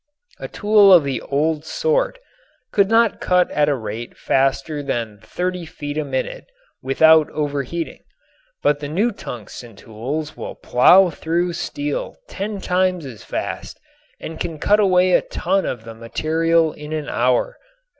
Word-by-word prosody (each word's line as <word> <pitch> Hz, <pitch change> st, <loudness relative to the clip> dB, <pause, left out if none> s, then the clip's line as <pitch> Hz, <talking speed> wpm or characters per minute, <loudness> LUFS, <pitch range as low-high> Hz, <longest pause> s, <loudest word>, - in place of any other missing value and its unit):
A -, -, -5 dB
tool 210 Hz, -2 st, +4 dB
of 175 Hz, -4 st, +8 dB
the 140 Hz, -2 st, -2 dB
old 150 Hz, +2 st, -1 dB
sort 475 Hz, -, 0 dB, 0.5 s
could 200 Hz, -1 st, +3 dB
not 225 Hz, -1 st, +3 dB
cut 180 Hz, -1 st, +2 dB
at 150 Hz, 0 st, +2 dB
a 145 Hz, -, +2 dB
rate 115 Hz, 0 st, -7 dB
faster 135 Hz, +3 st, 0 dB
than 115 Hz, -7 st, -3 dB
thirty 180 Hz, +9 st, -3 dB
feet 145 Hz, -2 st, -7 dB
a 155 Hz, -, -1 dB
minute 140 Hz, -, -4 dB, 0.4 s
without 160 Hz, +3 st, +5 dB
overheating, 145 Hz, +2 st, -3 dB, 0.6 s
but 145 Hz, 0 st, +2 dB
the 145 Hz, -, -5 dB
new 200 Hz, +11 st, +1 dB
tungsten 120 Hz, -, -9 dB
tools 135 Hz, +10 st, -5 dB
will -, -, -7 dB
plow 180 Hz, +9 st, +5 dB
through 170 Hz, +3 st, -1 dB
steel 295 Hz, -, -4 dB
ten 205 Hz, +1 st, -5 dB
times 180 Hz, -3 st, 0 dB
as 115 Hz, -7 st, -10 dB
fast -, -, -5 dB, 0.4 s
and 160 Hz, 0 st, -8 dB
can 165 Hz, -2 st, -4 dB
cut 205 Hz, +8 st, +3 dB
away 185 Hz, -2 st, +4 dB
a -, -, +5 dB
ton 190 Hz, +3 st, -1 dB
of 115 Hz, -3 st, -4 dB
the 115 Hz, 0 st, -9 dB
material 160 Hz, +8 st, 0 dB
in 150 Hz, +1 st, -8 dB
an 155 Hz, -2 st, -3 dB
hour. 125 Hz, -, 0 dB
155 Hz, 150 wpm, -20 LUFS, 135-185 Hz, 0.6 s, of